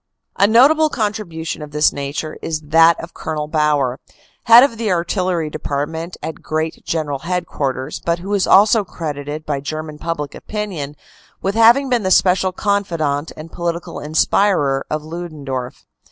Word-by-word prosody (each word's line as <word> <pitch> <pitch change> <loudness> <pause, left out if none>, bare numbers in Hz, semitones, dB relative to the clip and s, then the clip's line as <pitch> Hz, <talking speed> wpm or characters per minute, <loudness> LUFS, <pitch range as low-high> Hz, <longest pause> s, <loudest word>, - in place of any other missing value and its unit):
A 200 - +4
notable 290 +8 +5
contribution 205 - -3
of 150 - -7
this 150 +1 +2
nature 145 +2 -4
is 155 -1 -3
that 165 +2 +4
of 170 - -9
Col. 150 -1 -4
Bauer, 150 -4 +1 0.5
head 230 +2 +9
of 230 -5 0
the 220 -3 0
artillery 175 -2 -1
department 155 +3 -4
at 160 - -6
Great 155 +1 -3
General 150 -4 -2
Head 180 +3 -2
quarters, 135 -1 -3
but 170 0 0
who 190 +4 -5
is 200 -2 +1
also 210 +2 +5
credited 150 -3 -6
by 145 -2 -2
German 155 +2 -6
public 150 -4 -4
opinion 185 -10 -5 0.5
with 195 - 0
having 230 +5 +5
been 245 -3 +1
the 185 - -1
special 185 0 +3
confidant 170 -7 -1
and 155 +1 -9
political 170 0 -4
inspirer 150 -2 +1
of 155 0 -2
Ludendorff. 150 -6 -6
165 Hz, 155 wpm, -19 LUFS, 150-190 Hz, 0.5 s, head